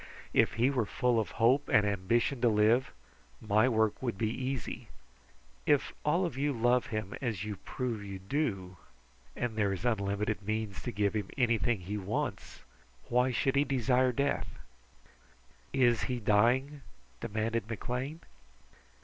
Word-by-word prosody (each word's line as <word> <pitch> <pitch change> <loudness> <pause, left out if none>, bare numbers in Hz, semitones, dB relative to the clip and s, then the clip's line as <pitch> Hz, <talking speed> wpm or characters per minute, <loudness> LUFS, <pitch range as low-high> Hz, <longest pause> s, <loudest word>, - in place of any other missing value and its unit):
If - - +3
he 120 +5 +2
were 125 -6 0
full 125 0 +1
of 110 - -2
hope 130 +5 +3
and 105 -1 +4
ambition 115 +6 0
to 120 - +5
live, 110 +4 +3 0.5
my 110 +3 +3
work 110 -3 +1
would 120 -6 -2
be 110 +1 0
easy. 130 -3 -4 0.8
If 145 -2 +2
all 170 +5 +2
of 165 - -4
you 145 +2 0
love 120 +1 +2
him 110 -3 -4
as 110 -7 -2
you 105 -2 -5
prove 120 -2 -4
you 100 -1 -6
do, 95 - -2 0.6
and 120 -3 -2
there 105 -2 +1
is 95 +4 -4
unlimited 105 -2 0
means 110 -1 -3
to - - -4
give 100 +1 0
him 105 -3 -2
anything 115 -4 +2
he 100 +4 -4
wants, 100 +3 -4 0.5
why 125 +2 +3
should 135 +3 +1
he 140 - +4
desire 130 -1 +2
death?" 140 +3 -1 1.1
"Is 120 -5 +3
he 120 +3 -2
dying?" 120 +7 +2 0.4
demanded 110 - -2
McLean. 125 +8 -4
115 Hz, 150 wpm, -31 LUFS, 105-130 Hz, 1.1 s, to